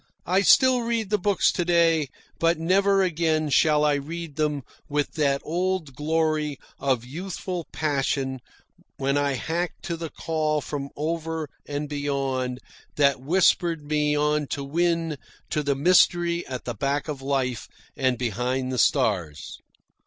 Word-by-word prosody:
I 185 +3 +3
still 260 +4 +5
read 230 -3 -2
the 210 - +2
books 200 +1 +2
to 175 - -1
day, 165 -3 +3 0.3
but 165 +1 +3
never 195 +4 +3
again 160 -3 0
shall 150 +1 +4
I 150 - +3
read 155 +2 -5
them 150 -2 -1 0.3
with 145 0 0
that 140 -3 +1
old 175 -2 -1
glory 155 -1 0 0.2
of 130 -4 0
youthful 180 +4 -5
passion 135 -3 -1 0.6
when 135 +1 0
I 145 -1 +1
harked 170 +6 -3
to 170 - -3
the 165 -1 -5
call 155 -1 -1
from 140 -1 -5
over 160 0 -3 0.2
and 145 +1 -3
beyond 135 -3 -2 0.4
that 140 -3 +3
whispered 170 +1 +2
me 150 0 +1
on 150 0 +1
to 140 - -3
win 165 +1 0 0.3
to 150 - +1
the 140 -1 0
mystery 170 +2 +3
at 130 -1 -6
the 120 - -3
back 140 +7 -1
of 145 -3 -5
life 135 -3 -1 0.3
and 130 -2 +1
behind 125 +2 -1
the 125 - -1
stars. 95 - 0
150 Hz, 145 wpm, -25 LUFS, 140-170 Hz, 0.6 s, still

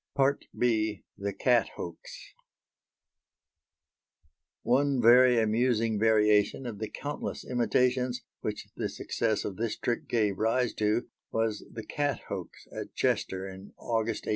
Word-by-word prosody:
B. 110 -4 +1
THE 100 0 -3
CAT 120 +2 +2
HOAX 85 -1 -9 2.3
One 135 +2 +2
very 120 +1 +7
amusing 110 0 +2
variation 105 +2 +3
of 110 -4 -5
the 110 - -3
countless 145 0 -5
imitations, 125 0 +1 0.2
which - - -4
the - - -2
success 110 - -1
of 95 - -4
this 115 -1 -2
trick 120 - -2
gave 105 -5 +1
rise 115 +2 +1
to, 105 +3 +1 0.2
was 115 -2 -1
the 110 - -7
"cat 145 -1 -1
hoax" - - -6
at - - -7
Chester, 95 0 0
in 95 +1 -10
August, 115 -1 -2
1815. - - -4
115 Hz, 125 wpm, -29 LUFS, 105-125 Hz, 2.3 s, very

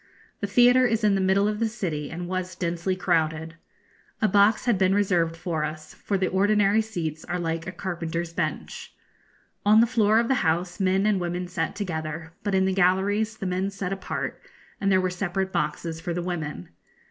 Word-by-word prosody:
The 205 - -2
theatre 245 +4 +5
is 225 -1 0
in 210 -1 +4
the 195 - +1
middle 190 +2 +3
of 210 0 -2
the 230 - +2
city, 165 -10 -4
and 175 +2 -5
was 185 0 -3
densely 175 +1 -1
crowded. 160 -3 0 0.7
A 215 - +3
box 205 +4 +4
had 235 -6 +2
been 190 0 +3
reserved 175 -5 +1
for 165 -3 -2
us, 155 0 -6
for 200 - -2
the 190 - +1
ordinary 205 +2 +3
seats 165 -8 -4
are 180 - -2
like 165 -1 -3
a - - -3
carpenter's 170 -3 -4
bench. - - -4 0.7
On 210 +2 +6
the 230 - +6
floor 220 -2 +3
of 230 0 +2
the 265 - +3
house 175 +3 0
men 190 +1 +2
and 205 -3 +2
women 175 +1 -3
sat 180 +1 -3
together, 160 -4 -4
but 200 -1 -1
in 190 0 +3
the 190 - +1
galleries 200 +4 +2
the 195 - -5
men 185 +1 -1
sat 195 -1 -4
apart, 195 - -4 0.4
and 195 -1 +2
there 190 - +5
were 185 -1 0
separate 190 +1 -2
boxes 160 +1 -2
for 170 0 -3
the 175 - -2
women. 160 - -4
185 Hz, 195 wpm, -25 LUFS, 170-205 Hz, 0.7 s, On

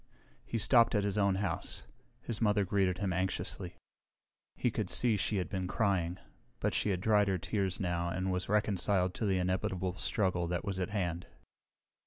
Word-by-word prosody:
He 115 - -2
stopped 115 +1 +4
at 105 - +2
his 100 +1 0
own 100 -1 +3
house. 95 -4 -3 0.4
His 115 -2 -4
mother 105 -2 +3
greeted 95 -2 +1
him 95 -2 -1
anxiously. 95 +1 -2 0.8
He - - 0
could - - -2
see 120 -3 +4
she 105 +1 0
had 90 - -1
been 95 -2 -3
crying, 95 -4 0 0.4
but - - 0
she - - 0
had 90 -2 -1
dried 105 -1 +3
her 95 -1 +1
tears 95 0 -2
now 85 -2 -1
and 95 +2 -2
was 90 0 -2
reconciled 100 -3 +2
to 110 - -2
the 95 -1 +2
inevitable 90 0 -1
struggle 90 -4 0
that 85 +2 -2
was 100 -2 -3
at 90 - -1
hand. 90 -4 -2
95 Hz, 180 wpm, -32 LUFS, 90-105 Hz, 0.8 s, stopped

